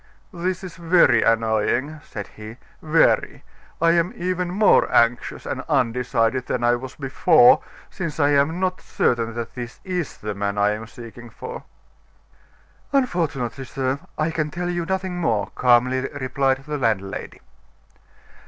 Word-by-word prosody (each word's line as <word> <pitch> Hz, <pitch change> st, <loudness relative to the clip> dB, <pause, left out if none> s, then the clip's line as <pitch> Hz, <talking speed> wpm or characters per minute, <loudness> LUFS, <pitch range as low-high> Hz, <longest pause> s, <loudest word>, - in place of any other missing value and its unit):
"This 185 Hz, +2 st, -3 dB
is 180 Hz, -3 st, -8 dB
very 170 Hz, -8 st, +4 dB
annoying," 115 Hz, +6 st, +1 dB
said 105 Hz, -2 st, -7 dB
he, 110 Hz, +2 st, -11 dB, 0.2 s
"very! 160 Hz, +1 st, +2 dB, 0.4 s
I 165 Hz, 0 st, +4 dB
am 170 Hz, +1 st, +1 dB
even 180 Hz, 0 st, -2 dB
more 200 Hz, +3 st, +4 dB
anxious 115 Hz, +1 st, +1 dB
and -, -, -3 dB
undecided 125 Hz, +1 st, +1 dB
than 125 Hz, -, -2 dB
I 120 Hz, 0 st, +4 dB
was 125 Hz, +2 st, -5 dB
before, 180 Hz, -, +5 dB, 0.3 s
since 165 Hz, -5 st, -5 dB
I 145 Hz, -1 st, +4 dB
am 145 Hz, +4 st, +2 dB
not 185 Hz, -1 st, -1 dB
certain 115 Hz, -1 st, 0 dB
that 120 Hz, -1 st, -5 dB
this 120 Hz, -1 st, -7 dB
is 180 Hz, -5 st, -3 dB
the 105 Hz, 0 st, -5 dB
man 100 Hz, +1 st, -3 dB
I 105 Hz, 0 st, +3 dB
am 110 Hz, +1 st, -5 dB
seeking 120 Hz, +1 st, -11 dB
for." -, -, -8 dB, 1.3 s
"Unfortunately, 160 Hz, -, -1 dB
sir, 135 Hz, +1 st, -2 dB, 0.2 s
I 155 Hz, +1 st, 0 dB
can 155 Hz, -2 st, -1 dB
tell 175 Hz, +3 st, -3 dB
you 175 Hz, -1 st, -3 dB
nothing 190 Hz, -1 st, -2 dB
more," 105 Hz, -, 0 dB
calmly 125 Hz, +2 st, +2 dB
replied 135 Hz, 0 st, 0 dB
the 150 Hz, -1 st, -4 dB
landlady. 105 Hz, -6 st, -2 dB
135 Hz, 145 wpm, -22 LUFS, 115-170 Hz, 1.3 s, before